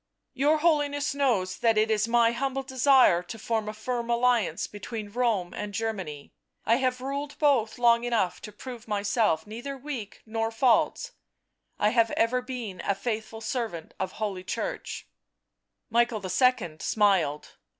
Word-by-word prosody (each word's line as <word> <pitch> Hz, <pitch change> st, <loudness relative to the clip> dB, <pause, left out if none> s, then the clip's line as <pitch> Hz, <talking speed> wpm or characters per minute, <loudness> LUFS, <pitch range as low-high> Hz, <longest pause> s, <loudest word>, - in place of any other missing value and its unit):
" -, -, -55 dB
Your 290 Hz, +4 st, +3 dB
Holiness 295 Hz, -2 st, +1 dB
knows 225 Hz, -10 st, +1 dB
that 225 Hz, -2 st, +3 dB
it 220 Hz, +1 st, +3 dB
is 215 Hz, 0 st, +2 dB
my 230 Hz, 0 st, +4 dB
humble 270 Hz, +2 st, -2 dB
desire 260 Hz, -8 st, +4 dB
to 180 Hz, +5 st, -8 dB
form 220 Hz, 0 st, -2 dB
a -, -, -5 dB
firm 235 Hz, +2 st, -3 dB
alliance 235 Hz, -7 st, +2 dB
between 210 Hz, 0 st, -7 dB
Rome 225 Hz, -7 st, 0 dB
and 210 Hz, -1 st, -5 dB
Germany. 190 Hz, -11 st, -4 dB, 0.3 s
I 230 Hz, -, +4 dB
have 255 Hz, -1 st, 0 dB
ruled 280 Hz, +2 st, -4 dB
both 255 Hz, -8 st, +2 dB
long 235 Hz, -1 st, +4 dB
enough 230 Hz, -7 st, 0 dB
to 210 Hz, -, -8 dB
prove 235 Hz, +2 st, -9 dB
myself 205 Hz, -5 st, +1 dB
neither 240 Hz, +6 st, -6 dB
weak 260 Hz, -6 st, -7 dB
nor 225 Hz, 0 st, -1 dB
false, 245 Hz, -, +2 dB, 0.7 s
I 210 Hz, -, +3 dB
have 230 Hz, 0 st, +3 dB
ever 245 Hz, +3 st, +2 dB
been 245 Hz, -8 st, -6 dB
a 200 Hz, -, +1 dB
faithful 220 Hz, +1 st, -4 dB
servant 220 Hz, -8 st, -4 dB
of 190 Hz, -1 st, -3 dB
Holy 200 Hz, -4 st, -3 dB
Church -, -, -4 dB, 0.4 s
" -, -, -56 dB
Michael 235 Hz, -2 st, +2 dB
II. 185 Hz, -4 st, +2 dB
smiled. 185 Hz, -9 st, +1 dB
230 Hz, 155 wpm, -27 LUFS, 210-255 Hz, 0.7 s, my